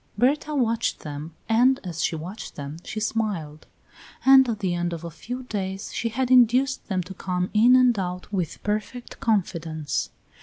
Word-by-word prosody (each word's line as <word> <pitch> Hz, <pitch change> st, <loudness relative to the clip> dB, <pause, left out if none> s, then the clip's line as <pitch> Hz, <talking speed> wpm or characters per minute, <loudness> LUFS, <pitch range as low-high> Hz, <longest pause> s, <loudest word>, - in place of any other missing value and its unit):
Berta 290 Hz, +6 st, +1 dB
watched 230 Hz, -3 st, 0 dB
them, 150 Hz, +2 st, -7 dB
and 250 Hz, +4 st, +4 dB
as 170 Hz, -3 st, -4 dB
she -, -, 0 dB
watched 180 Hz, +8 st, -7 dB
them 145 Hz, +1 st, -6 dB
she 220 Hz, -, -5 dB
smiled; 200 Hz, -9 st, -2 dB, 0.6 s
and 265 Hz, -1 st, +7 dB
at 225 Hz, -, -1 dB
the 190 Hz, -4 st, -1 dB
end 175 Hz, 0 st, -1 dB
of 165 Hz, 0 st, -6 dB
a 170 Hz, -, -6 dB
few 245 Hz, +11 st, -6 dB
days 195 Hz, -4 st, -4 dB
she 230 Hz, -, -1 dB
had 255 Hz, +3 st, -1 dB
induced 255 Hz, +2 st, +4 dB
them 185 Hz, -3 st, -1 dB
to 190 Hz, -, -9 dB
come 180 Hz, -1 st, -2 dB
in 235 Hz, +4 st, +6 dB
and 250 Hz, -4 st, +4 dB
out 180 Hz, +2 st, -5 dB
with 180 Hz, -5 st, -3 dB
perfect 215 Hz, +4 st, -4 dB
confidence. 165 Hz, -8 st, -1 dB
210 Hz, 175 wpm, -25 LUFS, 175-245 Hz, 0.6 s, and